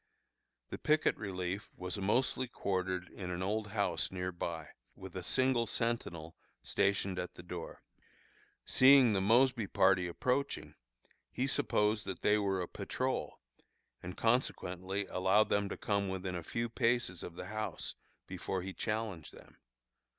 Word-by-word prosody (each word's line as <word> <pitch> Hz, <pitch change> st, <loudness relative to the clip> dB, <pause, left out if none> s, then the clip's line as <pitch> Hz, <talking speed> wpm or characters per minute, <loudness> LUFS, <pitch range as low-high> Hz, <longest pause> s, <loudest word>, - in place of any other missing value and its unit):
The -, -, -5 dB
picket 155 Hz, 0 st, +3 dB
relief 95 Hz, 0 st, -4 dB
was 90 Hz, +1 st, -3 dB
mostly 125 Hz, +6 st, +1 dB
quartered 95 Hz, -4 st, -2 dB
in 90 Hz, -3 st, -7 dB
an 90 Hz, +1 st, -3 dB
old 105 Hz, +2 st, -1 dB
house 100 Hz, -5 st, 0 dB
near 90 Hz, 0 st, -3 dB
by, 85 Hz, -3 st, -4 dB, 0.3 s
with -, -, -10 dB
a -, -, -3 dB
single 130 Hz, -3 st, +2 dB
sentinel 85 Hz, -9 st, -2 dB, 0.3 s
stationed 100 Hz, -1 st, +1 dB
at 90 Hz, -, -5 dB
the 85 Hz, -, -10 dB
door. 85 Hz, -1 st, -7 dB, 0.8 s
Seeing 130 Hz, -3 st, +7 dB
the 95 Hz, -, +2 dB
Mosby 115 Hz, +2 st, +4 dB
party 95 Hz, -2 st, +3 dB
approaching, 125 Hz, +10 st, -1 dB, 0.6 s
he 130 Hz, -, -1 dB
supposed 105 Hz, -5 st, +1 dB
that 95 Hz, -, -5 dB
they 105 Hz, +1 st, +4 dB
were 95 Hz, -2 st, 0 dB
a -, -, -5 dB
patrol, -, -, -3 dB, 0.6 s
and 90 Hz, +1 st, -7 dB
consequently 100 Hz, -5 st, 0 dB
allowed 95 Hz, +4 st, +3 dB
them 100 Hz, -1 st, +1 dB
to -, -, -5 dB
come 100 Hz, -2 st, 0 dB
within 95 Hz, -1 st, -3 dB
a 90 Hz, -, -3 dB
few 115 Hz, +8 st, -2 dB
paces 115 Hz, -5 st, 0 dB
of 85 Hz, -, -7 dB
the -, -, -6 dB
house 110 Hz, 0 st, -3 dB, 0.3 s
before 95 Hz, -2 st, -3 dB
he 95 Hz, 0 st, -5 dB
challenged 105 Hz, -7 st, -3 dB
them. -, -, -16 dB
100 Hz, 145 wpm, -34 LUFS, 90-115 Hz, 0.8 s, Seeing